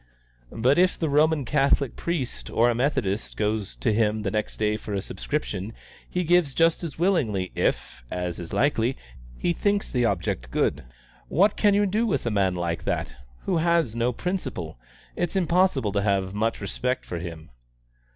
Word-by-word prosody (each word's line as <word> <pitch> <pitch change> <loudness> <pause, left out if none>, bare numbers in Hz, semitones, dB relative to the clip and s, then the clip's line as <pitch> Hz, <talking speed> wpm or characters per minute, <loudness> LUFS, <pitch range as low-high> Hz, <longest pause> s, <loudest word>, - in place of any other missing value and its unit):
But 130 +7 +2
if 180 0 +3
the 160 - -1
Roman 150 0 +3
Catholic 140 -1 +2
priest 165 -8 -3
or 120 +2 +3
a - - +1
Methodist 115 -5 -1
goes 105 -2 -1
to 110 - 0
him 110 0 +1
the 100 -2 -2
next 105 0 -2
day 105 0 +1
for 105 -1 -5
a - - 0
subscription, 105 -1 -4 0.4
he 180 - -1
gives 170 -5 +3
just 165 +1 +3
as 160 -5 -5
willingly 125 - +1
if, - - -1
as 90 -1 -3
is 85 -2 -7
likely, 130 -3 +1 0.4
he 175 - 0
thinks 205 +3 0
the 125 -2 +2
object 85 - -1
good. - - 0 0.4
What 200 +6 +3
can 205 -2 +3
you 205 0 +3
do 215 +4 +1
with 205 - -1
a 115 - 0
man 95 -3 +2
like 85 -1 -2
that, - - -2 0.3
who 180 - +1
has 165 -7 +2
no 120 +1 +1
principle? 115 - -4 0.4
It's 175 +1 -2
impossible 175 - +2
to 100 0 0
have 100 -2 0
much 110 +2 -1
respect 125 +6 -2
for 85 - -4
him." 80 -4 -8
120 Hz, 175 wpm, -25 LUFS, 100-165 Hz, 0.4 s, if